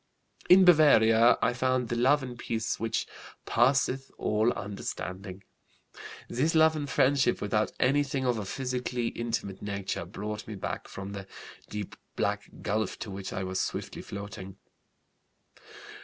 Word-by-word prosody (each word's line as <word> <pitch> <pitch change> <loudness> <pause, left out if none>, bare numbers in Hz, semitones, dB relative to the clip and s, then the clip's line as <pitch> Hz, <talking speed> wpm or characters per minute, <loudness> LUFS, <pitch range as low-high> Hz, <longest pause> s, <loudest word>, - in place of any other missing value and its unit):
"In 185 +1 +8
Bavaria 120 -9 +6
I - - +3
found 130 -1 0
the 120 - -1
love 135 +4 +3
and 125 -2 -6
peace 115 -1 -3
'which 115 0 -1 0.4
passeth 130 +2 +2
all 110 +3 +2
understanding.' 100 -2 -6 0.8
This 150 +7 0
love 160 0 +5
and 145 -2 -3
friendship 135 -1 +3
without 105 +1 0
anything 135 0 +1
of 120 -3 +1
a 105 - -4
physically 125 0 -2
intimate 115 -5 -4
nature 100 -4 -3
brought 105 +3 -6
me 110 - -6
back 95 - -5
from 95 0 -7
the 100 -1 -7 0.4
'deep 105 -2 -5 0.2
black - - -1
gulf' 110 0 -1
to 110 - -6
which 95 0 -6
I 95 - -3
was 95 0 -1
swiftly - - -4
floating. 100 -1 -8
115 Hz, 140 wpm, -29 LUFS, 100-130 Hz, 0.8 s, In